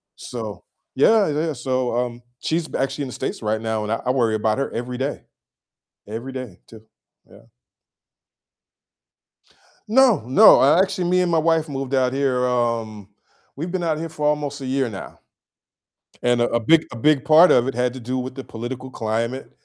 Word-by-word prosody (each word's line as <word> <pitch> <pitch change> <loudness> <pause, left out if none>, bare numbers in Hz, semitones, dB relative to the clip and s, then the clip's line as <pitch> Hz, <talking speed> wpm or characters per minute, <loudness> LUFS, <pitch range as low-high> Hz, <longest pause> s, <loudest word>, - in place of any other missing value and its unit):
So 110 -5 -7 0.3
yeah, 210 +9 +4
yeah, 155 +1 -1
so, 130 -2 -2
um, 120 -1 -3 0.2
she's 160 0 -2
actually 135 +2 -2
in - - -4
the - - -8
States - - -4
right 110 0 -1
now, 110 -1 -2
and 105 - -4
I 115 - -1
I 125 - +2
worry 120 -4 +1
about 110 +1 0
her 140 - -2
every 125 +1 -5
day. 135 +3 -3 0.9
Every 115 +5 -6
day 130 -8 -7
too, 110 -1 -14 0.5
yeah. - - -18 2.4
No, 245 -1 +4
no, 130 +3 +7 0.2
actually, 190 -1 0
me 180 0 +3
and 180 -1 0
my 165 - +3
wife 160 0 +1
moved 135 -1 -5
out 130 -1 +2
here, 135 -2 0
um 115 -4 -2 0.5
we've 165 +5 -5
been 185 -1 -2
out 160 -2 0
here 165 +1 -5
for 150 -1 -4
almost 145 -1 -1
a - - -5
year 130 -1 0
now, 95 -3 -9 1.0
and 120 0 +2
a 120 - +3
a 115 - +1
big 160 +8 +3
a - - -8
big 145 +3 +2
part 160 +3 +7
of 120 - +4
it 135 - -2
had 125 +1 -1
to 130 - -8
do 130 +2 -3
with 130 +1 -6
the 135 - -7
political 130 +3 -7
climate 115 +3 -3
130 Hz, 185 wpm, -22 LUFS, 115-150 Hz, 2.4 s, no